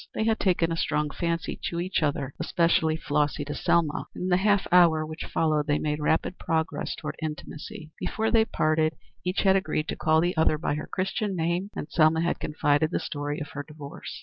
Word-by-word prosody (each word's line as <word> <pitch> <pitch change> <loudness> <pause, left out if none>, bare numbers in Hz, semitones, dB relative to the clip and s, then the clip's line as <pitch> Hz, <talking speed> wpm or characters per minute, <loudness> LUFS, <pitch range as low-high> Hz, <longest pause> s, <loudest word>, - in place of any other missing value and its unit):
They - - 0
had 225 0 +1
taken 175 -3 +2
a - - 0
strong 150 -2 0
fancy 170 0 -2
to 170 - -3
each 180 +1 -1
other, 140 -3 -1
especially 160 -2 +2
Flossy 145 -1 0
to 145 - -4
Selma, 170 -1 +1
and - - -5
in 185 - -1
the 180 - +4
half 200 0 +2
hour 165 -3 +5
which 155 +1 -6
followed 155 -2 +1
they 145 0 +2
made 150 0 -1
rapid 160 +4 0
progress 160 -1 -1
toward - - -6
intimacy. 155 0 -6
Before 220 0 -1
they 225 -2 +5
parted 155 -4 +1 0.3
each 180 +1 0
had 190 -1 +4
agreed 190 -5 0
to - - -1
call 160 0 +3
the 175 +2 +1
other 160 -1 +3
by 150 - -1
her 150 - -4
Christian 195 +2 -1
name, 175 +3 -1
and - - -4
Selma 160 0 +3
had 170 - 0
confided 150 0 +1
the - - -1
story 145 0 -3
of 145 - -6
her 145 - -5
divorce. 145 -1 -9
160 Hz, 205 wpm, -27 LUFS, 150-180 Hz, 0.3 s, hour